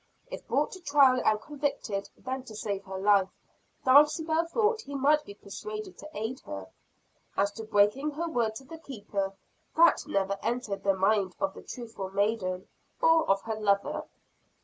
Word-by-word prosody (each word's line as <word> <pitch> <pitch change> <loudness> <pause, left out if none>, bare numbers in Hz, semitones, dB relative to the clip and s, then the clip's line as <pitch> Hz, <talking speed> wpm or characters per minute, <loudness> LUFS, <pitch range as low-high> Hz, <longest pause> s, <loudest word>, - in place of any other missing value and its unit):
If - - -7
brought - - +1
to 375 - -8
trial 280 -5 +5
and 215 0 +3
convicted 280 -8 -3
then 260 +1 -4
to 220 - -10
save 200 -2 -3
her 190 0 -6
life, 195 -1 +4 0.6
Dulcibel 315 +4 +5
thought 445 +4 +1
he 285 -8 -8
might 295 +2 +3
be 200 - -10
persuaded 425 - -7
to 305 - -9
aid 225 +5 -3
her. 100 -1 -7 0.7
As 200 +1 +2
to 220 +1 -8
breaking 210 +7 +3
her 335 +4 -2
word 235 -8 0
to 270 - -8
the 320 +5 -10
Keeper, 205 -8 -4 0.4
that 335 +1 +6
never 195 0 0
entered 230 -5 -2
the 195 -1 +3
mind 195 -1 +2
of 195 0 0
the - - -10
truthful 225 -6 -7
maiden, 195 -2 -1 0.3
or 325 0 +4
of 195 0 +3
her 225 - -3
lover. 215 +10 +1
225 Hz, 170 wpm, -29 LUFS, 200-295 Hz, 0.7 s, that